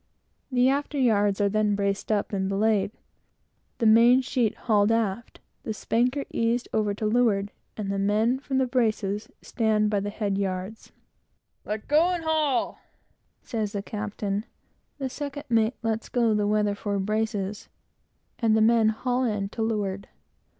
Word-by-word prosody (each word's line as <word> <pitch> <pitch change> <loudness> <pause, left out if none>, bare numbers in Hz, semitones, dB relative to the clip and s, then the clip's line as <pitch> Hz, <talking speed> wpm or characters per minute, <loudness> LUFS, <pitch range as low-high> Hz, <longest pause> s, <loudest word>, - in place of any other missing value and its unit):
The 250 0 +3
after 285 +2 0
yards 205 -6 +2
are 200 - +3
then 210 0 +1
braced 200 +1 -1
up 205 0 0
and 190 -1 -1
belayed, 205 0 +1 0.9
the 230 - -1
main 235 +4 +6
sheet 245 -4 0
hauled 210 -2 +3
aft, 225 0 -2 0.2
the 220 - -4
spanker 250 +7 0
eased 235 +1 0
over 210 -2 +1
to 215 - -4
leeward, 210 -3 +2 0.3
and 200 -2 -3
the 200 - -1
men 215 +6 +2
from 270 -1 -3
the 265 - +3
braces 215 -5 -1
stand 215 -2 +1
by 205 - +2
the 205 +1 -3
head 205 -2 -2
yards. 190 +2 -4 0.7
"Let 210 0 -4
go 315 +4 +4
and 355 -2 -2
haul!" 310 -6 0 0.6
says 215 -3 -3
the 200 -1 -3
captain; 205 0 -3 0.5
the 270 -2 -3
second 285 +2 -6
mate 225 +1 +2
lets 225 0 -2
go 235 -3 +2
the 210 -1 +1
weather 210 -1 +1
fore 200 0 -3
braces, 210 0 -2 0.7
and 220 -2 +3
the - - +3
men 225 0 +4
haul 250 +3 -1
in 210 -4 -1
to 225 - -6
leeward. 205 -3 -2
220 Hz, 155 wpm, -26 LUFS, 205-240 Hz, 0.9 s, main